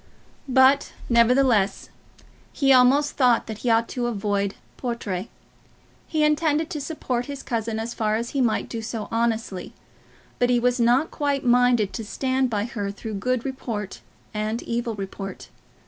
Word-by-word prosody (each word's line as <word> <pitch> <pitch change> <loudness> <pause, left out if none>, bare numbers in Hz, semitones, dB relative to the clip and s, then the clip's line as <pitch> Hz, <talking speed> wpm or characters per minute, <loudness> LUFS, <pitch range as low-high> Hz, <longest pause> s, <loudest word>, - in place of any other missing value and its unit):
But, 265 +2 +4 0.2
nevertheless, 235 -4 +3 0.6
he 275 -2 +3
almost 265 +3 +5
thought 250 -4 +4
that 220 -1 -7
he 245 - -1
ought 230 0 +3
to 245 -1 -2
avoid 200 -3 -1 0.2
Portray. 225 -6 -4 0.8
He 310 -1 0
intended 300 +1 +2
to 300 - -3
support 255 -5 -3
his 280 -1 -6
cousin 225 -1 -2
as 230 +1 -4
far 215 -1 0
as 235 +2 -3
he 275 - 0
might 235 -3 +1
do 230 - -5
so 220 -1 -5
honestly; 225 -5 -1 0.7
but 245 - +3
he 245 -1 +3
was 245 +1 +1
not 245 +7 +3
quite 285 -3 -1
minded 245 -4 +3
to 225 - -4
stand 260 +4 0
by 210 -3 -1
her 205 -4 -4
through 215 +2 -6
good 245 +5 -1
report 230 -7 -5 0.3
and 215 +2 -2
evil 235 -1 -2
report. 195 -1 -7
235 Hz, 155 wpm, -24 LUFS, 220-260 Hz, 0.8 s, almost